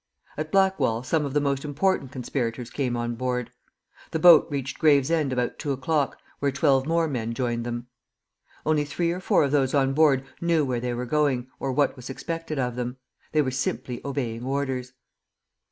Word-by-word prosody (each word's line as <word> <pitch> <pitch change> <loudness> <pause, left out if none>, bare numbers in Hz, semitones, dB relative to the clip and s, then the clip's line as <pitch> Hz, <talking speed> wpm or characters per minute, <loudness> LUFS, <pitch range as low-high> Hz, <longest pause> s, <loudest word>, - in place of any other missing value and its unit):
At 155 +1 -4
Blackwall 170 -12 +2
some 150 +3 0
of 140 - -4
the - - +5
most 140 -1 0
important 150 -1 0
conspirators 125 -2 -3
came 125 -4 -1
on 120 0 -2
board. 125 0 -2 0.6
The - - -1
boat 165 -1 +8
reached 135 -2 -4
Gravesend 150 -1 +3
about 125 -1 -1
two 145 - -2
o'clock, 140 +2 0 0.2
where 140 -1 +1
twelve 135 -1 +2
more 165 0 +2
men 115 -5 -3
joined 120 -2 -1
them. 120 0 -4 0.8
Only 155 -1 +2
three 155 +3 -1
or 180 - -3
four 190 -1 +3
of 140 - 0
those 140 -2 +2
on 135 -1 +3
board 140 -3 +4 0.2
knew 165 -3 +2
where 125 -2 -1
they 120 0 -2
were 125 +1 -3
going, 130 -3 0
or 135 - -2
what 140 +1 +2
was 125 -1 -9
expected 165 +3 -4
of 125 -2 -1
them. 125 +1 -3 0.3
They 155 -1 +3
were 130 - -1
simply 130 -1 -3
obeying 125 -5 -3
orders. 130 -1 -2
135 Hz, 185 wpm, -25 LUFS, 125-150 Hz, 0.8 s, boat